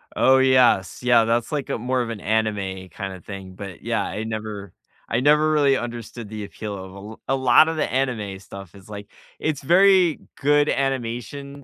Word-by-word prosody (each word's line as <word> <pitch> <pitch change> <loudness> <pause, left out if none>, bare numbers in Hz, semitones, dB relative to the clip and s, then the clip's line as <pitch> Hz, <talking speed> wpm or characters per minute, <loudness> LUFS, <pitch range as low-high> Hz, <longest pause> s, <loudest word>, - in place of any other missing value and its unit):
Oh 130 0 +5
yes, 130 -8 +3
yeah, 120 -2 +5
that's 115 +4 0
like 145 -3 -3
a - - -1
more 125 +2 -1
of 115 - -3
an 110 -3 -5
anime 100 -4 -2
kinda 95 +1 -7
thing, 95 -2 -9
but 95 -2 -9
yeah, - - -1
I 105 - -4
never 105 -3 -6 0.3
I 115 - 0
never 150 +3 +4
really 140 -3 +3
understood 120 -2 -7
the 105 -1 -6
appeal 105 0 -7
of 95 0 -9
a - - -13
l 105 +3 -11
A 135 - +1
lot 130 +4 +5
of 160 - -2
the 150 - -1
anime 115 -7 -2
stuff 100 -1 -11
is 100 +1 -16
like 105 -1 -8 0.3
it's 150 -3 -2
very 180 +1 +4 0.2
good 145 +1 +3
animation, 135 +2 -3
115 Hz, 190 wpm, -23 LUFS, 100-135 Hz, 0.3 s, Oh